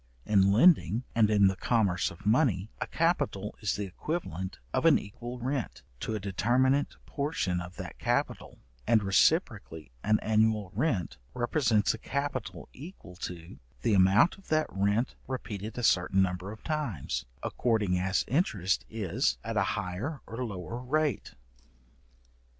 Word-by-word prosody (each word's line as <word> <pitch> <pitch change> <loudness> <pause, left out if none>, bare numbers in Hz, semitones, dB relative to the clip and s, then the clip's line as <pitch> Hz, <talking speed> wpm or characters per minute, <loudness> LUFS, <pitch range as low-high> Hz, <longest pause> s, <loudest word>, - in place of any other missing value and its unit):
In 100 -2 +4
lending, 120 - +4
and 110 -2 +4
in 105 -2 +4
the 95 0 +3
commerce 95 -4 +1
of 85 - -13
money, 110 - +2
a - - -1
capital - - 0
is - - -1
the 100 - -3
equivalent 95 - -4 0.2
of - - +1
an - - +7
equal 120 +5 -7
rent, 125 - -3 0.2
to 110 - -3
a - - -2
determinate 125 +8 +1
portion 140 - -2
of 90 +1 -9
that - - -8
capital; - - -1 0.3
and 110 -3 +4
reciprocally 80 -6 +1
an 110 0 +3
annual 110 -3 +2
rent 110 - -1 0.2
represents 120 -4 +2
a 115 - -8
capital 140 +4 -4
equal 145 - -11
to 85 -2 -7 0.2
the 115 - +2
amount 100 - +4
of 195 - -20
that 155 0 +2
rent 100 +5 +1
repeated 110 -4 -5
a 120 - -3
certain 95 -1 +3
number 90 +1 -3
of 110 - -11
times, 140 - -3 0.2
according 105 -7 +1
as 95 +2 0
interest 105 - +1
is 100 - 0
at - - -4
a - - +3 0.2
higher 110 - -4
or 115 +3 -5
lower 105 +1 -5
rate. 145 -1 -1
110 Hz, 145 wpm, -29 LUFS, 95-125 Hz, 0.3 s, an